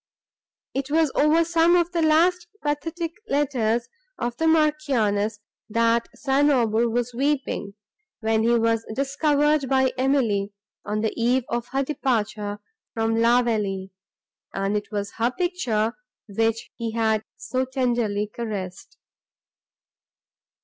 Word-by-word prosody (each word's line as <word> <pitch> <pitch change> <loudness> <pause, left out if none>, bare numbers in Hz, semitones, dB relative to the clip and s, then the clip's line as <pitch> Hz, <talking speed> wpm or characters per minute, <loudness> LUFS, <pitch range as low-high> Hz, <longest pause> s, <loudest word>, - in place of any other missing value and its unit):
It 270 +1 -3
was 315 -1 +2
over 315 +3 +4
some 335 +1 +4
of 345 0 +2
the 340 -1 0
last 345 +3 +3 0.2
pathetic 325 +3 -2 0.2
letters 245 -5 0 0.3
of 240 0 -3
the 325 - +1
Marchioness, 270 -10 +2 0.3
that 230 +1 +2
St. 280 +2 +2
Aubert 235 -3 +2
was 240 +1 -1
weeping, 270 -6 -1 0.4
when 220 -1 +1
he 235 +1 +3
was 230 0 +1
observed 290 +3 +1
by 265 -1 +3
Emily, 230 -7 +1 0.3
on 210 0 -2
the 220 - -1
eve 245 +2 +2
of 240 0 -2
her 270 +1 -1
departure 215 -7 -1 0.4
from 225 0 +1
La 235 +2 +4
Vallée, 195 -5 -2 0.6
and 195 +1 0
it 210 +1 -3
was 205 -1 -3
her 230 +1 +2
picture, 250 - -1 0.3
which 225 +2 -1
he 230 -2 -3
had 220 -1 +1
so 255 +3 -2
tenderly 240 -6 0
caressed. 205 -4 -6
240 Hz, 125 wpm, -24 LUFS, 220-290 Hz, 0.6 s, over